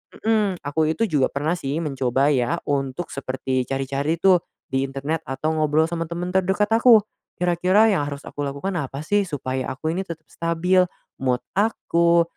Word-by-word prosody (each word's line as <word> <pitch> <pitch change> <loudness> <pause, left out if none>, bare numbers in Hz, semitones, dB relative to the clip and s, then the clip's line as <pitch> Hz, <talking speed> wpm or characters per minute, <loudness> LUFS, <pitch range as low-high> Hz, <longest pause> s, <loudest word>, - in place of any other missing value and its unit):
itu - - -17
mhm, 220 -2 +3 0.2
aku 145 +3 -1
itu 230 - 0
juga 135 -4 +3
pernah 150 +4 -2
sih 145 +5 -2
mencoba 135 0 +1
ya 135 +4 +1
untuk 140 +3 -2
seperti 130 -1 -2
cari-cari 135 +3 -1
tuh 180 +1 +4 0.3
di 135 +1 +1
internet 140 +4 -3
atau 135 +4 -1
ngobrol 155 +1 +3
sama 165 -1 -2
temen 175 +2 -4
terdekat 190 +3 +1
aku. 225 -2 +6 0.3
Kira-kira 180 +5 +3
yang 145 -7 0
harus 140 0 -6
aku - - -11
lakukan 140 +7 -3
apa 140 +1 -5
sih 205 0 +1
supaya 130 -4 -3
aku 155 +4 -3
ini 190 - -1
tetap 160 -1 -7
stabil, 180 +2 +2 0.3
mood 125 -1 0
aku, 170 -5 +3
155 Hz, 170 wpm, -23 LUFS, 135-180 Hz, 0.3 s, aku